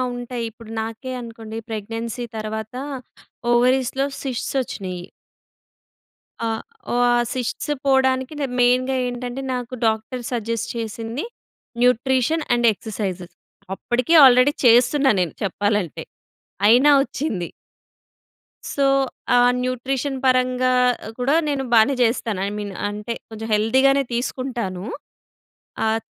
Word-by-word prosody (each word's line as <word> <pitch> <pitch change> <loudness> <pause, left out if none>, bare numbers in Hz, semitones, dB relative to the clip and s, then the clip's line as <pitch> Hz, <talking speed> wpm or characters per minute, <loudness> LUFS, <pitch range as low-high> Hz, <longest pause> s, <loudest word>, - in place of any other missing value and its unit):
ఉంటాయి. 245 -1 -5
ఇప్పుడు 225 0 -13
నాకే 225 +4 -6
అనుకోండి 225 -1 -8
ప్రెగ్నెన్సీ 225 +3 -4
తర్వాత 220 +1 -5 0.8
ఓవరీస్‌లో 255 +2 +2 0.2
శిష్ట్స్ 265 0 -3
వచ్చినయి. 185 -6 -6 1.4
ఆ! 230 - 0 0.4
ఓహ్, 245 - +2
ఆ - - +3 0.2
శిష్ట్స్ 255 +3 -3
పోవడానికి 265 0 +2 0.3
మెయిన్‌గా 255 +2 +3
ఏంటంటే, 245 +1 -5
నాకు 250 0 -5
డాక్టర్ 220 +3 -2
సజెస్ట్ 230 -1 -2
చేసింది 225 +4 -4 0.6
న్యూట్రిషన్ 260 +5 +2
అండ్ 240 -1 +3
ఎక్సర్సైజెస్. 190 -3 -5 0.4
అప్పటికే 245 - 0
ఆల్రెడీ 255 +3 +6
చేస్తున్నా 250 +4 +5
నేను 175 -3 -1
చెప్పాలంటే. 205 -2 -1 0.6
అయినా 255 +6 +6
వచ్చింది. 245 - -3 1.2
సో 280 -1 +1 0.5
ఆహ్, 245 0 +6
న్యూట్రిషన్ 260 +2 -2
పరంగా 255 0 +3 0.5
కూడా 270 +5 +2
నేను 280 -2 -1
బానే 225 +5 +5
చేస్తాను. 225 -3 0
ఐ - - -2
మీన్ 205 -2 -5 0.2
అంటే, 210 +2 -4 0.2
కొంచెం 225 0 -7
హెల్తీగానే 265 +6 +3
తీసుకుంటాను. 235 -6 -3 1.0
ఆహ్, 220 +1 +1
240 Hz, 105 wpm, -22 LUFS, 220-260 Hz, 1.4 s, ఆల్రెడీ